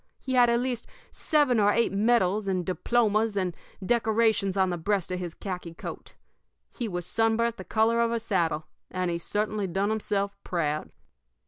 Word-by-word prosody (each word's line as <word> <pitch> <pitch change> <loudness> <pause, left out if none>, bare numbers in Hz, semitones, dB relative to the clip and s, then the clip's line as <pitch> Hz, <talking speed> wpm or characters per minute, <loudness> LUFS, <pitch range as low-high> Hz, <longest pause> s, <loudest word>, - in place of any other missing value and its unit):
He 260 - -4
had 245 -1 +6
at 235 0 +3
least 245 -2 -2 0.2
seven 290 -7 +2
or 205 0 +5
eight 230 +2 +2
medals 210 -1 +2
and 185 -2 0
diplomas 215 +2 +1
and 185 -3 -1 0.3
decorations 220 -3 +2
on 190 -1 +3
the 175 - -2
breast 195 +1 -1
of 180 - -2
his 175 -2 -5
khaki 180 -4 -6
coat; - - -8 0.6
he 240 - -3
was 175 -4 -4
sunburnt 225 +2 +1
the - - -7
color 230 +1 +2
of 230 0 +2
a 235 - 0
saddle, 170 -8 0 0.2
and 185 -1 -1
he 170 - -2
certainly 210 +2 -1
done 195 +4 0
himself 200 -2 -1
proud. 155 -4 -1
205 Hz, 175 wpm, -27 LUFS, 185-230 Hz, 0.6 s, had